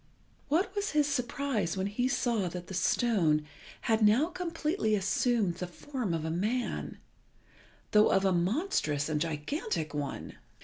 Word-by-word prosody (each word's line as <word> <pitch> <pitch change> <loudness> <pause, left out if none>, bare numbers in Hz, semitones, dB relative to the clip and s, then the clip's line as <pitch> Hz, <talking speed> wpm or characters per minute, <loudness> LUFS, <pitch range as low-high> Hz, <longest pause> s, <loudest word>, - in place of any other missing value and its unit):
What 335 +9 +1
was 405 -3 -1
his 300 -1 +4
surprise 250 - -1
when 190 - 0
he 215 +5 0
saw 235 -7 0
that 180 +1 -6
the 190 - -8
stone 180 -6 +2 0.4
had 225 -1 +1
now 225 +10 +5
completely 330 - -1
assumed 205 -1 +1
the 180 - -4
form 245 +3 -4
of 160 -1 -3
a 160 - -1
man, 215 +9 -2 0.9
though 210 0 +6
of 195 0 +3
a 190 - +4
monstrous 175 - 0
and 150 -1 0
gigantic 160 - -2
one! 145 -2 -4
210 Hz, 145 wpm, -30 LUFS, 175-275 Hz, 0.9 s, though